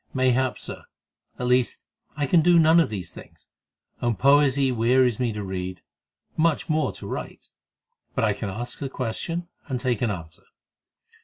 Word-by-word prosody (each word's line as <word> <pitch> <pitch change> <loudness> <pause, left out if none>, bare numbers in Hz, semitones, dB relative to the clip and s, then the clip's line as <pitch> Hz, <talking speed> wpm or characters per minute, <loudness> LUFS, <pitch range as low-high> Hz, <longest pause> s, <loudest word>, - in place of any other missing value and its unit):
"Mayhap, 130 0 +2
Sir. - - -7 0.5
At 125 - -3
least 125 0 +1 0.3
I 145 - +1
can 165 +4 +4
do 175 +2 +5
none 165 +1 +6
of 165 - +3
these 95 -5 -6
things, - - -14 0.5
and 120 -2 0
poesy 140 0 +4
wearies 125 0 +3
me 125 -2 0
to 105 -1 -5
read, 95 -1 -5 0.5
much 160 -1 +1
more 155 -1 +1
to - - -9
write. - - -7 0.6
But 125 - 0
I 105 -2 +3
can 100 0 -5
ask 120 +6 -6
a 135 - -3
question 165 +8 -4 0.2
and 130 -4 -2
take 125 -3 -1
an 120 - +1
answer." 85 -5 -7
125 Hz, 165 wpm, -25 LUFS, 110-145 Hz, 0.6 s, none